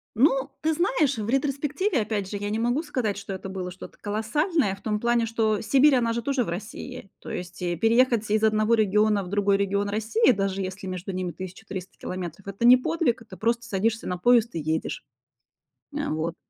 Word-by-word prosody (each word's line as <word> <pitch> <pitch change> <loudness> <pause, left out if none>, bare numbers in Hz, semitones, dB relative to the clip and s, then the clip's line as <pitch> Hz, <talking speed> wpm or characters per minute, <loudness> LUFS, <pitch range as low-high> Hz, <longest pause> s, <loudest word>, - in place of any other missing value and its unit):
Ну, 270 +3 +3
ты 320 +1 +1
знаешь, 315 - +1
в 215 0 -3
ретроспективе 280 - 0
опять 210 -3 -2
же 205 - -3
я 205 +1 -3
не 215 +2 -1
могу 240 +5 +1
сказать, 245 -10 -2
что 200 -1 -6
это 190 0 -6
было 185 -1 -5
что-то 185 - -11
колоссальное 220 - 0
в 195 - -20
том 210 -1 -1
плане, 235 0 +2
что 220 -2 0
Сибирь 270 +5 +5
она 235 -2 +1
же 235 - -2
тоже 270 +1 0
в 210 - -6
России. 210 +4 -7
То - - -10
есть 180 0 -6
и 175 -1 -1
переехать 230 +2 +3
из 215 0 +2
одного 215 +1 +3
региона 210 -1 +3
в - - -8
другой 200 0 +2
регион 200 +1 0
России, 220 - +3
даже 195 -3 -1
если 190 +1 -5
между 185 +1 -5
ними 185 -1 -3
1300 185 +1 -8
километров- 185 +1 -6
это 200 +4 -2
не 250 +1 +9
подвиг, 255 -2 0
это 225 - -12
просто 235 +1 0
садишься 220 +3 -1
на 180 - -2
поезд 235 +3 +3
и - - -1
едешь. 160 +1 -2 0.9
А 295 -1 -2
вот. 160 +2 -2
215 Hz, 200 wpm, -25 LUFS, 195-245 Hz, 0.9 s, не